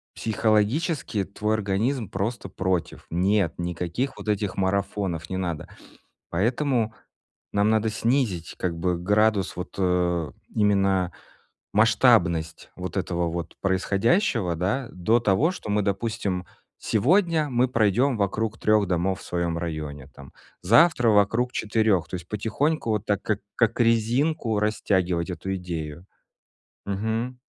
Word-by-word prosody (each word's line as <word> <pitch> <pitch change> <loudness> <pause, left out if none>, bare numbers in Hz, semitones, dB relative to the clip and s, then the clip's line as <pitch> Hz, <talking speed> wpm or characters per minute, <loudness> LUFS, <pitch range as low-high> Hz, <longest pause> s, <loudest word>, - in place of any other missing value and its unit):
психологически 110 - 0
твой 105 +2 -2
организм 110 +3 -1
просто 100 +1 -3
против: 90 -3 -2
"Нет, 95 0 +2
никаких 90 +9 -3
вот - - -6
этих 105 -2 -1
марафонов 95 -3 -1
не 95 - -3
надо!" 85 -5 -3 0.6
Поэтому 115 - 0 0.6
нам 100 +1 +3
надо 110 0 +2
снизить 110 - 0
как 85 -2 -2
бы 90 0 0
градус, 105 0 +2
вот, 90 0 -6
э, 90 -3 +1 0.2
именно 95 -3 +2 0.6
масштабность 80 -1 +3
вот 90 0 -5
этого 85 -2 -1
вот 85 0 -5
происходящего, 100 - +1
да, 105 +10 -1
до 110 +7 +2
того, 115 - +2
что 180 - -8
мы, 105 0 +2
допустим: 100 -2 -2 0.3
"Сегодня 160 - +2
мы 125 0 +2
пройдем 120 +3 +2
вокруг 110 +2 -1
3 105 -1 +3
домов 90 +1 0
в - - -12
своем 85 -1 -1
районе, 75 -5 -5
там, 70 -1 -13 0.3
завтра 120 - +5
вокруг 110 +4 +3
4". 105 -5 +1
То - - -5
есть 85 -2 -8
потихоньку, 115 +7 -1
вот 105 -1 -1
так, 105 -2 0
как 105 -1 -1
как 115 0 +1
резинку, 115 +1 +1
растягивать 95 -5 0
эту 95 +3 -4
идею. 85 -2 -6 0.8
Мгм. 110 +5 -2
100 Hz, 125 wpm, -25 LUFS, 90-115 Hz, 0.8 s, завтра